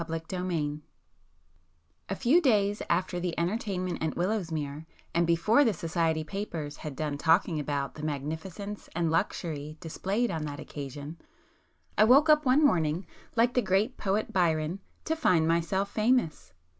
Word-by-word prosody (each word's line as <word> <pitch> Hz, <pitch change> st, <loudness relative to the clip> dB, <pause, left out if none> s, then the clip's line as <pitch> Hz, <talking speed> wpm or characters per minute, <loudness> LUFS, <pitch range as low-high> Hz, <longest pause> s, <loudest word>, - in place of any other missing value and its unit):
[p 165 Hz, -, -5 dB
290]XXV 165 Hz, -2 st, -3 dB, 1.3 s
A 195 Hz, -, -1 dB
few 265 Hz, -, +4 dB
days 205 Hz, -7 st, +2 dB
after 180 Hz, -1 st, 0 dB
the 175 Hz, -1 st, -3 dB
entertainment 185 Hz, 0 st, -2 dB
at 160 Hz, -, -1 dB
Willowsmere, 160 Hz, -6 st, -2 dB, 0.3 s
and 170 Hz, 0 st, +2 dB
before 190 Hz, +11 st, +4 dB
the 230 Hz, -6 st, +2 dB
society 165 Hz, -1 st, 0 dB
papers 160 Hz, -5 st, -5 dB
had 150 Hz, -3 st, -7 dB
done 145 Hz, 0 st, -3 dB
talking 165 Hz, 0 st, +3 dB
about 140 Hz, -2 st, -2 dB
the 150 Hz, -, -9 dB
magnificence 160 Hz, +8 st, -5 dB
and 165 Hz, -2 st, +1 dB
luxury 155 Hz, -3 st, -2 dB
displayed 195 Hz, +7 st, -1 dB
on 160 Hz, -3 st, -3 dB
that 145 Hz, -1 st, -6 dB
occasion, 145 Hz, +2 st, -7 dB, 0.8 s
I 215 Hz, -, +8 dB
woke 280 Hz, +7 st, +6 dB
up 300 Hz, -2 st, +5 dB
one 280 Hz, +4 st, +5 dB
morning, 165 Hz, -, +2 dB, 0.3 s
like 235 Hz, +1 st, +3 dB
the 250 Hz, -, +3 dB
great 205 Hz, +5 st, +1 dB
poet 205 Hz, +2 st, -1 dB
Byron, 165 Hz, -1 st, +1 dB, 0.3 s
"to 320 Hz, -, 0 dB
find 180 Hz, -, +3 dB
myself 170 Hz, +4 st, 0 dB
famous." 215 Hz, -, +1 dB
170 Hz, 145 wpm, -29 LUFS, 155-205 Hz, 1.3 s, I